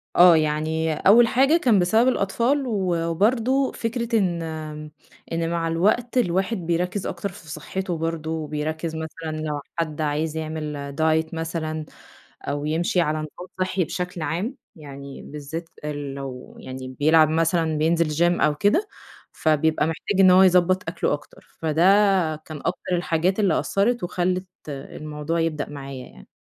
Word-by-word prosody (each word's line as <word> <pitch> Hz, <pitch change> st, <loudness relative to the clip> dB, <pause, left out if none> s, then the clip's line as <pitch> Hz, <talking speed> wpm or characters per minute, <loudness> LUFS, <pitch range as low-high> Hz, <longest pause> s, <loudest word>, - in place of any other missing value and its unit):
آه 175 Hz, -1 st, +8 dB
يعني 155 Hz, +1 st, 0 dB
أول 225 Hz, +9 st, +6 dB
حاجة 270 Hz, +7 st, +4 dB
كان 240 Hz, -, +3 dB
بسبب 220 Hz, +7 st, +3 dB
الأطفال 255 Hz, +5 st, +1 dB
و 190 Hz, -6 st, 0 dB
وبرضه 240 Hz, +9 st, +2 dB
فكرة 235 Hz, 0 st, -1 dB
إن 175 Hz, -4 st, 0 dB, 0.9 s
إن 165 Hz, 0 st, -1 dB
مع 170 Hz, -1 st, -1 dB
الوقت 215 Hz, +10 st, +1 dB
الواحد 190 Hz, 0 st, +1 dB
بيرَكّز 180 Hz, +3 st, -1 dB
أكتر 175 Hz, +3 st, -4 dB
في 180 Hz, -3 st, -14 dB
صحته 175 Hz, +4 st, -4 dB
برضه، 160 Hz, -1 st, -3 dB
بيرَكّز 155 Hz, +2 st, -3 dB
مثلًا 160 Hz, 0 st, -5 dB
لو 150 Hz, -2 st, -3 dB, 0.2 s
حد 160 Hz, -2 st, -2 dB
عايز 155 Hz, +1 st, -1 dB
يعمل 150 Hz, -3 st, -5 dB
Diet 160 Hz, 0 st, +2 dB
مثلًا 160 Hz, -1 st, -3 dB, 0.6 s
أو 145 Hz, +1 st, -3 dB
يمشي 170 Hz, +3 st, +1 dB
على 155 Hz, -1 st, 0 dB
نظام 155 Hz, +4 st, -7 dB
صحّي 185 Hz, 0 st, +1 dB
بشكل 180 Hz, +1 st, -4 dB
عام، 175 Hz, -, -2 dB, 0.2 s
يعني 140 Hz, -3 st, -10 dB
بالذات 150 Hz, +3 st, -7 dB
إ 150 Hz, -, -2 dB
لو 135 Hz, -3 st, -7 dB
يعني 130 Hz, 0 st, -8 dB
بيلعب 155 Hz, +1 st, +5 dB
مثلًا، 165 Hz, 0 st, +1 dB
بينزل 165 Hz, +2 st, +2 dB
Gym 170 Hz, +3 st, +2 dB
أو 150 Hz, -1 st, +3 dB
كده، 210 Hz, -, +2 dB, 0.4 s
فبيبقى 155 Hz, 0 st, +1 dB
محتاج 185 Hz, +4 st, -2 dB
إن 190 Hz, -1 st, +7 dB
هو 185 Hz, +1 st, +7 dB
يضَبّط 185 Hz, 0 st, +4 dB
أكله 165 Hz, -, -1 dB
أكتر. 145 Hz, -, -8 dB
فده 160 Hz, 0 st, 0 dB, 0.5 s
كان 155 Hz, 0 st, -9 dB
أكتر 180 Hz, -, -1 dB
الحاجات 175 Hz, +3 st, 0 dB
اللي 195 Hz, -6 st, +3 dB
أثّرت 220 Hz, +3 st, 0 dB
وخلّت 180 Hz, +1 st, -1 dB, 0.2 s
الموضوع 150 Hz, +3 st, -4 dB
يبدأ 160 Hz, -3 st, -1 dB
معايا 135 Hz, -3 st, -7 dB
يعني. 65 Hz, -1 st, -16 dB
165 Hz, 145 wpm, -23 LUFS, 155-185 Hz, 0.9 s, آه